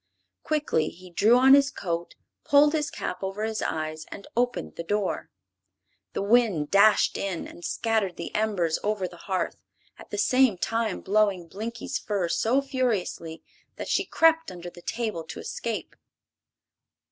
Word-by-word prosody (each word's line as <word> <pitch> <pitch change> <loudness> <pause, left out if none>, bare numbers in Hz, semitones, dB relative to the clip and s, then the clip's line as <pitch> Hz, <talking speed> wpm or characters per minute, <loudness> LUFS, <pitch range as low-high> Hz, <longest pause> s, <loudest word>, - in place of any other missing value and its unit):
Quickly 300 - 0
he 185 +1 -14
drew 220 +8 +5
on 265 +1 +7
his 280 0 +6
coat, 170 -9 -4 0.3
pulled 295 0 +5
his 300 -2 0
cap 180 - -5
over 195 +2 -3
his 220 0 -2
eyes 155 0 -3
and 200 - -9
opened 240 - -1
the - - -4
door. 205 +3 -1 0.8
The - - -2
wind 205 -9 +3
dashed 205 +2 +5
in 190 -4 -3
and 175 - -13
scattered 220 -5 0
the 170 - -6
embers 195 -7 0
over 210 -3 0
the 175 - -13
hearth, 185 -1 -1 0.4
at - - -13
the 205 - -4
same 255 0 +4
time 225 +4 -1
blowing 200 -3 +1
Blinkie's 230 +7 -4
fur 195 -5 -1
so 255 +10 +2
furiously 230 - -2 0.3
that - - -6
she - - +2
crept 325 -3 +3
under 175 -1 -8
the 175 - -13
table 220 -5 -3
to - - -8
escape. - - -4
210 Hz, 155 wpm, -26 LUFS, 175-240 Hz, 0.8 s, on